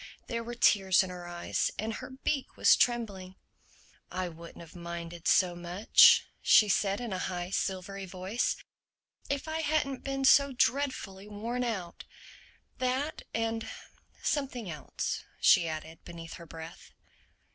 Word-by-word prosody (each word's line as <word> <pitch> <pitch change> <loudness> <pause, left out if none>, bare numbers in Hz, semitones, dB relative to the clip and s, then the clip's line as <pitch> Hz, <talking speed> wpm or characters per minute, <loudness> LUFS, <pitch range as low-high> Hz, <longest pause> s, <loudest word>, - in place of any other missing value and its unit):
There 230 -1 -3
were 240 +1 -6
tears 195 -5 +4
in 185 - -6
her 175 -1 -8
eyes 175 0 -1
and 220 +1 -2
her - - -7
beak 265 +1 -3
was - - +6
trembling. 200 -6 -1 0.7
"I 185 -1 -3
wouldn't 170 +1 -11
have 170 +1 -13
minded 170 -1 -6
so 180 -2 +4
much," 190 - +6 0.2
she 210 - +6
said 195 +1 +1
in 235 -5 -4
a 185 - -2
high 180 -1 -3
silvery 195 0 -3
voice, 190 +5 -1 0.7
"if 280 +2 -2
I 315 0 -2
hadn't 290 -4 0
been 270 0 -2
so 280 0 +6
dreadfully 250 -7 -1
worn 230 +4 -3
out—That 250 - -5
and 225 0 -2 0.5
something 255 - -2
else," 150 -3 -4 0.2
she 170 - +5
added 160 +1 -6
beneath 165 -1 -9
her 170 -2 -10
breath. 160 +1 -10
195 Hz, 135 wpm, -30 LUFS, 175-250 Hz, 0.7 s, was